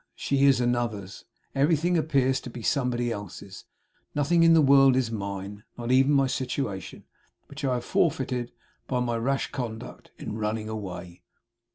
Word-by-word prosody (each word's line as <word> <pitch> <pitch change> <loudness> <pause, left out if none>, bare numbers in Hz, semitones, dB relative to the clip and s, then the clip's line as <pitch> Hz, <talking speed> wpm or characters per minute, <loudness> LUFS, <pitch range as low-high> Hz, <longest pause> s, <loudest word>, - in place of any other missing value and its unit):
She 140 0 +1
is 135 -3 +5
Another's. 120 -5 -2 0.3
Everything 160 +5 +2
appears 135 -4 +2
to - - -8
be 120 -1 -9
somebody 120 -3 0
else's. 100 -2 -8 0.5
Nothing 155 +4 +2
in 165 0 +6
the - - +6
world 135 -2 +6
is 125 -3 0
mine 100 -1 -5
not 120 0 -3
even 135 +2 +5
my 135 -1 +4
Situation 130 -6 -3 0.4
which 145 +1 -10
I 130 -2 +1
have 120 - -4
forfeited 125 -6 0 0.4
by 125 - 0
my 120 -1 -1
rash 135 +4 -1
conduct 115 -4 -6
in 110 - -6
running 110 0 -2
away. 90 -5 -7
125 Hz, 155 wpm, -26 LUFS, 110-135 Hz, 0.5 s, in